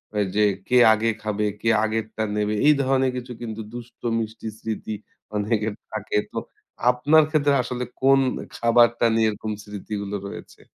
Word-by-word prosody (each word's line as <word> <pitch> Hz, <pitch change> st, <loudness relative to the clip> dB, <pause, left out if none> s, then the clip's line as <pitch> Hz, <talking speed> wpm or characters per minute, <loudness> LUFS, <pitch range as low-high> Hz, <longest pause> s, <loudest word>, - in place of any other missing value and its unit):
আ -, -, -1 dB, 0.2 s
যে 105 Hz, -, +3 dB, 0.3 s
কে 125 Hz, -, +3 dB, 0.2 s
আগে 110 Hz, +1 st, +1 dB
খাবে, 105 Hz, 0 st, -1 dB, 0.2 s
কে 115 Hz, -, +1 dB
আগেরটা 110 Hz, 0 st, -2 dB
নেবে? 105 Hz, 0 st, 0 dB
এই 150 Hz, -, +8 dB
ধরনের 130 Hz, -1 st, +2 dB
কিছু 125 Hz, 0 st, -6 dB
কিন্তু 110 Hz, -2 st, -5 dB
দুষ্ট-মিষ্টি 115 Hz, -2 st, -4 dB
স্মৃতি 110 Hz, 0 st, -4 dB, 0.4 s
অনেকের 105 Hz, +1 st, 0 dB, 0.2 s
থাকে। 105 Hz, -1 st, -2 dB
তো -, -, -7 dB, 0.5 s
আপনার 145 Hz, +6 st, +5 dB
ক্ষেত্রে 145 Hz, -2 st, +2 dB
আসলে 125 Hz, 0 st, -4 dB, 0.2 s
কোন 135 Hz, +1 st, +5 dB, 0.2 s
এ -, -, -10 dB
খাবারটা 120 Hz, 0 st, +4 dB
নিয়ে 110 Hz, -1 st, +3 dB
এরকম 110 Hz, +1 st, -4 dB
স্মৃতিগুলো 105 Hz, 0 st, -5 dB
রয়েছে? -, -, -10 dB
115 Hz, 150 wpm, -24 LUFS, 105-125 Hz, 0.5 s, এই